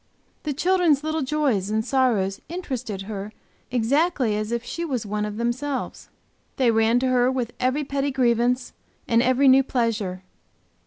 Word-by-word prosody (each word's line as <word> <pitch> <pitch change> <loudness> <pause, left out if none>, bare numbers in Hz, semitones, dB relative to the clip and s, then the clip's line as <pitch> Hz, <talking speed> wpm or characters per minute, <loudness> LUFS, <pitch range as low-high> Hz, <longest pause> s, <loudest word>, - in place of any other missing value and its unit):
The 300 - -3
children's 340 -2 +2
little 315 0 -1
joys 260 -9 0
and 220 +1 0
sorrows 225 -8 +1
interested 255 - -4
her 205 0 -6 0.4
exactly 255 0 +1
as 215 +1 -3
if 235 0 -1
she 335 +7 -5
was 260 -9 -2
one 210 +1 -2
of 210 0 -5
themselves; 255 +4 -3 0.5
they 255 -3 +3
ran 225 +1 +3
to 260 - +1
her 250 0 +3
with 245 -3 -3
every 260 +4 +1
petty 280 0 -1
grievance, 245 -1 +1 0.3
and 230 0 +3
every 255 +2 +3
new 265 +1 +7
pleasure. 220 -8 -2
250 Hz, 155 wpm, -24 LUFS, 220-275 Hz, 0.5 s, new